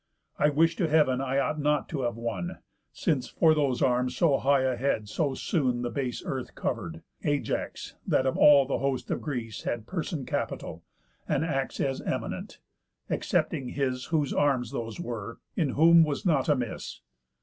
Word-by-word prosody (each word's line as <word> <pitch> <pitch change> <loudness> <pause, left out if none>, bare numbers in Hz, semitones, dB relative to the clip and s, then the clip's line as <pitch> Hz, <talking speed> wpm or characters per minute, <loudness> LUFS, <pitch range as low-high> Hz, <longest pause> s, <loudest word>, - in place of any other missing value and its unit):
I 150 - +5
wish 165 +3 +3
to 175 - +1
heav'n 150 -5 +3
I 135 0 -1
ought 145 +2 0
not 150 0 +1
to 145 -5 -3
have 120 -2 -1
won; 115 -7 -4 0.3
Since 135 -6 0
for 160 -1 +4
those 140 -5 +1
arms 125 0 +1
so 155 -5 +3
high 140 0 +3
a 130 -1 +1
head 120 -4 -1
so 140 +4 -1
soon 125 -8 0
The 120 - -2
base 130 -4 -3
earth 130 -2 -4
cover'd, 85 -9 -3 0.2
Ajax, 145 -1 -2
that 130 - +2
of 130 - +1
all 140 -2 +7
The 135 - -1
host 135 -2 -2
of - - -1
Greece 120 -7 -4
had 115 -2 -3
person 160 -3 -3
capital, 80 - -3 0.5
And 160 - +1
acts 135 -4 -2
as 135 -1 -1
eminent, - - -4 0.5
excepting 130 -2 0
his 130 -2 -2
Whose 155 -4 0
arms 130 -5 +1
those 115 +2 -5
were, 115 -7 -5 0.2
in 155 -5 +1
whom 165 +2 +7
was 150 +5 -2
nought 155 -7 +2
amiss. 125 -6 -2
135 Hz, 170 wpm, -28 LUFS, 125-150 Hz, 0.5 s, all